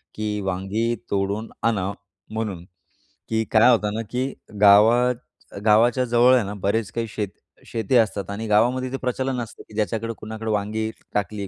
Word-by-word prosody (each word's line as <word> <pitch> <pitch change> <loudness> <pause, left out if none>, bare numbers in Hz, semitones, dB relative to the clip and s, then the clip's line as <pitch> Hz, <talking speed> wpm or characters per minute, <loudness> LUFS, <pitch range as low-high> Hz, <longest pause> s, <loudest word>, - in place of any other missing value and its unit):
की 105 -1 -2
वांगी 95 +5 -1 0.2
तोडून 100 +3 -1
आणा", 100 -4 +1 0.4
म्हणून 105 -6 -4 0.6
की 110 0 +1
काय 115 +3 +6
होतं 105 -3 +1
ना 115 - -1
की 130 +2 -1 0.3
गावात 115 +5 +6 0.5
गावाच्या 120 +4 +4
जवळ 120 +2 +5
आहे 120 - +3
ना, 100 - -5
बरेच 100 +2 -1
काही 115 -1 -3
शेत 105 -2 -4 0.4
शेती 115 +2 -1
असतात 105 -3 +1
आणि 110 +2 -4
गावामध्ये 125 +5 +2
ते 135 - -2
प्रचलन 130 0 -2
असतं, 115 - -9
की - - -15
ज्याच्याकडे 110 +2 -1
कुणाकडे 110 0 -6
वांगी 105 +1 -1 0.2
टाकली, 100 0 -2
110 Hz, 155 wpm, -23 LUFS, 105-120 Hz, 0.6 s, काय